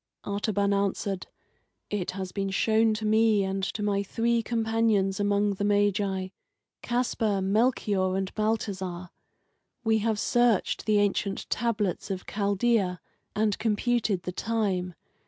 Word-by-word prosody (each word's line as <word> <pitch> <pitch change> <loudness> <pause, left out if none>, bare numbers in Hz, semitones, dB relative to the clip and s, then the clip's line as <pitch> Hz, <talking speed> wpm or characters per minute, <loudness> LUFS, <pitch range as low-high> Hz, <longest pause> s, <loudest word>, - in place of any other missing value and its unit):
Artaban 200 0 0
answered: 200 -1 -1 0.6
"It 205 -4 -2
has 190 -1 -4
been 195 -1 -2
shown 220 +3 +2
to 215 0 -4
me 220 -1 +4
and 195 0 -2
to 210 +2 -2
my 200 -1 +1
three 230 +3 0
companions 225 -4 +1
among 205 0 +2
the 200 - -4
Magi 205 -2 +1 0.5
Caspar, 235 -4 0
Melchior, 195 -2 +1
and 190 0 -3
Balthazar. 190 -5 -2 0.7
We 220 -1 +3
have 220 0 0
searched 240 -1 +1
the 215 -1 +4
ancient 200 -1 0
tablets 210 -7 -1
of 190 -2 -4
Chaldea 200 -2 +1 0.4
and 210 -1 +2
computed 220 -3 0
the 180 - -3
time. 190 -4 -1
205 Hz, 125 wpm, -27 LUFS, 195-220 Hz, 0.7 s, me